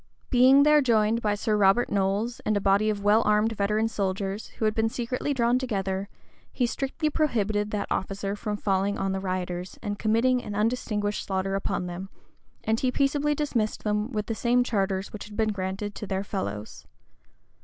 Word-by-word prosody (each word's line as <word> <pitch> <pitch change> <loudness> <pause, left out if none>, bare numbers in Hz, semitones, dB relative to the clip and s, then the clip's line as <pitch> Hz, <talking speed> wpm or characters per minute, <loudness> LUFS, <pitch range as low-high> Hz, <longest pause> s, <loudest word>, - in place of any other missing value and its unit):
Being 260 +3 +7
there 300 0 +6
joined 225 -2 +2
by 210 -2 +1
Sir 210 +1 0
Robert 205 +3 +3
Knolles, 200 +4 0
and 215 - 0
a - - +2
body 200 +2 +3
of 205 -1 -2
well 210 +2 +5
armed 210 +1 +3
veteran 215 +1 +1
soldiers, 195 -1 -2
who 220 - 0
had 215 - +2
been 220 0 +1
secretly 250 +4 -2
drawn 245 -2 +2
together, 195 -5 -2 0.4
he 250 - 0
strictly 270 +5 -2
prohibited 215 -9 0
that 210 -1 -2
officer 195 +1 -2
from 210 0 -3
falling 200 0 0
on 195 0 -1
the 190 - -1
rioters, 185 -1 -4
and 205 -2 -3
committing 240 +3 +2
an 205 - -5
undistinguished 210 -2 -1
slaughter 195 0 -1
upon 195 -2 -1
them; 180 +2 -6 0.5
and 220 +1 +1
he 255 - +1
peaceably 290 +2 +1
dismissed 245 -8 -1
them 210 +1 0
with 210 -3 -2
the 225 - -2
same 245 +2 +2
charters 195 -4 -1
which 210 - -7
had 210 0 -11
been 220 -1 +2
granted 195 +1 -4
to 210 - -7
their 190 0 -1
fellows. 185 - -5
210 Hz, 185 wpm, -26 LUFS, 195-235 Hz, 0.5 s, Being